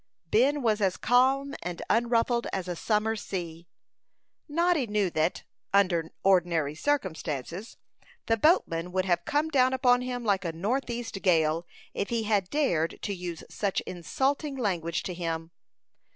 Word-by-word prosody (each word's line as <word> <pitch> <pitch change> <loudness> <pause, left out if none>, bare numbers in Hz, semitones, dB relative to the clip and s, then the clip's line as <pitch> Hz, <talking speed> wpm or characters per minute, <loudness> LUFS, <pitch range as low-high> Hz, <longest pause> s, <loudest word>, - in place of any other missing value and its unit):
Ben 275 +5 +3
was 215 -2 +2
as 190 -2 +1
calm 265 +4 +3
and 175 0 -5
unruffled 235 +1 +2
as 185 -2 -3
a 175 - -3
summer 215 +4 0
sea. 170 -5 -6 0.8
Noddy 335 -3 +2
knew 205 -3 0
that, 160 +2 0 0.3
under 175 -5 +3
ordinary 170 -6 +3
circumstances, 175 - -3 0.5
the 225 - +3
boatman 180 - +2
would 185 0 +1
have 175 -2 +1
come 300 +2 +1
down 260 -3 +3
upon 250 -1 +4
him 250 -1 -4
like 200 -2 +2
a 165 -2 -3
northeast 235 +3 -3
gale, 165 -2 +2 0.3
if 200 - -2
he 230 -1 0
had 205 -4 +1
dared 175 - 0
to 200 - -2
use 175 -3 -6
such 200 -2 -1
insulting 270 - -2
language 175 -8 -1
to 180 - -4
him. 165 -1 -4
200 Hz, 145 wpm, -28 LUFS, 170-245 Hz, 0.8 s, upon